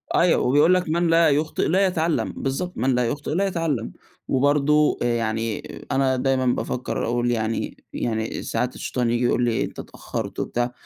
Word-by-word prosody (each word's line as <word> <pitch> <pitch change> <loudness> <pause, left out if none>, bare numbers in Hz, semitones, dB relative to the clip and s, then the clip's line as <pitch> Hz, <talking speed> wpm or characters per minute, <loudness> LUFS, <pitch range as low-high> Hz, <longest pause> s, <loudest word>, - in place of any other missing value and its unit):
أيوه 175 -1 +4
وبيقول 145 +7 +4
لك 180 -3 +1
من 170 +1 +1
لا 165 -1 +5
يخطئ 150 +2 0
لا 190 +4 +3
يتعلم، 165 -3 0
بالضبط 160 +7 -3
من 130 +2 +1
لا 125 0 +1
يخطئ 145 +4 -4
لا 195 +5 +1
يتعلم، 165 -10 -2 0.4
وبرضه 145 +2 +3
يعني 115 -2 -1 0.3
أنا 135 -1 +2
دايمًا 130 0 +1
بافكّر 125 0 -1
أقول 120 +1 0
يعني 110 -1 -2 0.2
يعني 110 -1 -2
ساعات 125 0 -2
الشيطان 125 -2 -2
ييجي 120 +1 +1
يقول 125 - +2
لي 120 -2 +1
أنت - - -7
اتأخرت - - -6
وبتاع 120 +1 -1
135 Hz, 165 wpm, -23 LUFS, 120-160 Hz, 0.4 s, لا